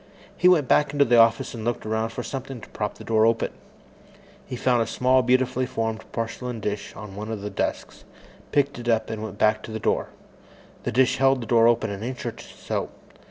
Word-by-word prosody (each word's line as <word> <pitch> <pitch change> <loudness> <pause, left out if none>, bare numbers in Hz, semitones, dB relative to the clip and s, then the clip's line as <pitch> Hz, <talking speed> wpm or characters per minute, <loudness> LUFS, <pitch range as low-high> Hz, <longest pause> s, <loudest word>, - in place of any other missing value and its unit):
He 180 - +3
went 165 -7 +5
back 145 +2 +3
into 145 -1 +4
the 120 -1 +5
office 115 0 +4
and 115 -2 -6
looked 120 0 -2
around 110 +1 -1
for 120 +2 -5
something 135 -1 -6
to - - -12
prop 105 -1 -3
the - - -11
door 110 -1 +2
open. 115 0 +1 1.0
He - - -5
found 120 -1 +2
a 115 - 0
small, 130 +1 +3
beautifully 130 +1 +1
formed 110 -1 -3
porcelain 115 +1 -4
dish 105 -1 -4
on 105 -2 -9
one 105 +2 -5
of 110 -3 -4
the 105 0 -5
desks, 95 - -3 0.5
picked 140 -3 +1
it 120 0 -4
up, 110 -1 +1
and 110 -1 -4
went 110 -2 -6
back 110 +1 +3
to - - -9
the 110 - -4
door. - - 0 0.8
The - - 0
dish 130 0 +3
held 135 -1 +3
the - - -6
door 115 0 +5
open 115 -3 +2
an 100 0 -6
inch 125 +2 -5
or - - -2
so. - - -5
115 Hz, 215 wpm, -24 LUFS, 110-130 Hz, 1.0 s, went